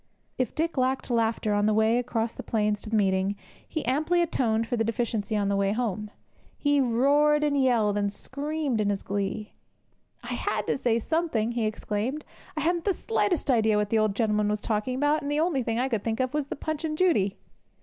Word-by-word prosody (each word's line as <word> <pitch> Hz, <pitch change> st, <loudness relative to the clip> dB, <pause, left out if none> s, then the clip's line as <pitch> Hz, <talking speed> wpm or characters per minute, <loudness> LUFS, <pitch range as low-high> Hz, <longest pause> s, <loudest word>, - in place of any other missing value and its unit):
If 255 Hz, -4 st, -1 dB
Dick 325 Hz, 0 st, -1 dB
lacked 260 Hz, 0 st, 0 dB
laughter 225 Hz, -2 st, +1 dB
on 205 Hz, 0 st, +2 dB
the 215 Hz, -, +2 dB
way 220 Hz, +2 st, +3 dB
across 230 Hz, -2 st, -2 dB
the -, -, -7 dB
plains 210 Hz, -2 st, 0 dB
to 215 Hz, -, -8 dB
the 225 Hz, -, 0 dB
meeting, 195 Hz, -1 st, +2 dB, 0.3 s
he 315 Hz, -, -3 dB
amply 310 Hz, +7 st, +2 dB
atoned 230 Hz, -8 st, 0 dB
for 245 Hz, -, -2 dB
the 225 Hz, -, +1 dB
deficiency 225 Hz, -2 st, -1 dB
on 200 Hz, -1 st, 0 dB
the 200 Hz, -, +1 dB
way 200 Hz, 0 st, +1 dB
home. 215 Hz, -3 st, -2 dB
How 210 Hz, -, -23 dB, 0.4 s
he 290 Hz, -1 st, +2 dB
roared, 285 Hz, +5 st, +3 dB
and 295 Hz, -1 st, +1 dB
yelled, 220 Hz, -5 st, +2 dB
and 205 Hz, 0 st, 0 dB
screamed 285 Hz, +1 st, -2 dB
in 205 Hz, -, +1 dB
his 200 Hz, -1 st, -2 dB
glee! 200 Hz, +2 st, -3 dB, 0.7 s
'I -, -, -9 dB
had -, -, -1 dB
to -, -, -1 dB
say 235 Hz, -3 st, +2 dB
something,' 240 Hz, -4 st, 0 dB
he 235 Hz, -2 st, 0 dB
exclaimed. 220 Hz, +6 st, -3 dB, 0.3 s
'I -, -, 0 dB
hadn't 340 Hz, +2 st, 0 dB
the 395 Hz, -3 st, +2 dB
slightest 355 Hz, -10 st, 0 dB
idea 220 Hz, -3 st, +3 dB
what 210 Hz, -1 st, 0 dB
the 225 Hz, -, +3 dB
old 215 Hz, -2 st, +1 dB
gentleman 210 Hz, -1 st, +1 dB
was 210 Hz, 0 st, 0 dB
talking 215 Hz, +4 st, -1 dB
about; 290 Hz, +3 st, +2 dB
and 285 Hz, -, -4 dB
the 295 Hz, +1 st, 0 dB
only 320 Hz, -5 st, +1 dB
thing 230 Hz, -1 st, -2 dB
I 255 Hz, +2 st, +1 dB
could 225 Hz, -6 st, -2 dB
think 225 Hz, +1 st, -2 dB
of 255 Hz, +1 st, 0 dB
was 295 Hz, -2 st, -1 dB
the -, -, -4 dB
Punch 310 Hz, +2 st, -4 dB
and 305 Hz, -1 st, -2 dB
Judy!' 210 Hz, -, +2 dB
230 Hz, 220 wpm, -27 LUFS, 210-290 Hz, 0.7 s, way